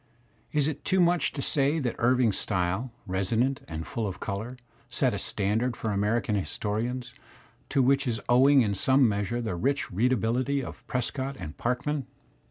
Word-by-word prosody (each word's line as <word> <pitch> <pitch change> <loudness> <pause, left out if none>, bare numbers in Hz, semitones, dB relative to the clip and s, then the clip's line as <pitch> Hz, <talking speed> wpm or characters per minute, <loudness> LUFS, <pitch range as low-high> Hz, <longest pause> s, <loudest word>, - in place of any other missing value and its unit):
Is 150 -2 +2
it 150 -2 -4
too 190 -1 +2
much 175 -4 +3
to 140 - -3
say 140 +2 +2
that 130 -7 -1
Irving's 120 -3 +3
style, 95 +5 -1
resonant 110 +8 0
and 80 0 -5
full 110 +8 -3
of 95 - -6
colour, 110 +5 -4 0.3
set - - +1
a - - -2
standard 110 +5 0
for 110 - -2
American 105 +3 0
historians, 115 +5 -2 0.6
to 135 - +3
which 135 +1 +3
is 115 -2 -1
owing 135 +3 +6
in 105 -2 0
some 130 +6 +4
measure 105 +3 -1
the 110 -6 -2
rich 140 +10 -1
readability 125 +6 +1
of - - -9
Prescott 130 +1 -2
and 75 -6 -7
Farkman? 135 +3 -2
120 Hz, 165 wpm, -28 LUFS, 105-135 Hz, 0.6 s, owing